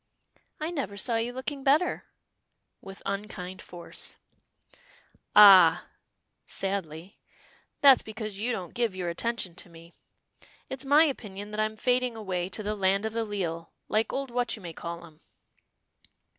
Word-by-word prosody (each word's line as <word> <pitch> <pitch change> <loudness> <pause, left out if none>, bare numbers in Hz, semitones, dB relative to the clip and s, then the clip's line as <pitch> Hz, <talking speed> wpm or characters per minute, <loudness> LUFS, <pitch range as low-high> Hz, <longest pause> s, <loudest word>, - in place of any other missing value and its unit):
"I 310 +2 -3
never 250 - -4
saw 230 +4 0
you 230 +2 -1
looking 270 +2 -5
better," 300 +7 +2 0.8
with 195 0 -11
unkind 195 -2 -5
force. 175 -1 -10 1.2
"Ah!" 190 -5 +9 0.6
sadly, 190 -2 -5 0.6
"that's 275 -3 +8
because 215 -2 -6
you 235 +4 -1
don't 185 -7 -5
give 235 -5 -1
your 180 -2 -3
attention 205 0 -2
to 175 - -8
me. 165 0 -15 0.8
It's 265 +1 -4
my 290 +3 +6
opinion 210 -8 -4
that 210 - -4
I'm 215 0 0
fading 250 0 +1
away 185 -5 -3
to 215 +3 -4
the 210 +1 -1
land 195 0 +1
o' - - 0
the 225 +1 -2
leal, 175 -6 -4 0.2
like 215 +1 +1
old 270 -2 -3
What 245 0 0
you 215 - -13
may 170 -2 -7
call 170 +1 -7
'em." 155 -2 -18
210 Hz, 145 wpm, -28 LUFS, 180-240 Hz, 1.2 s, Ah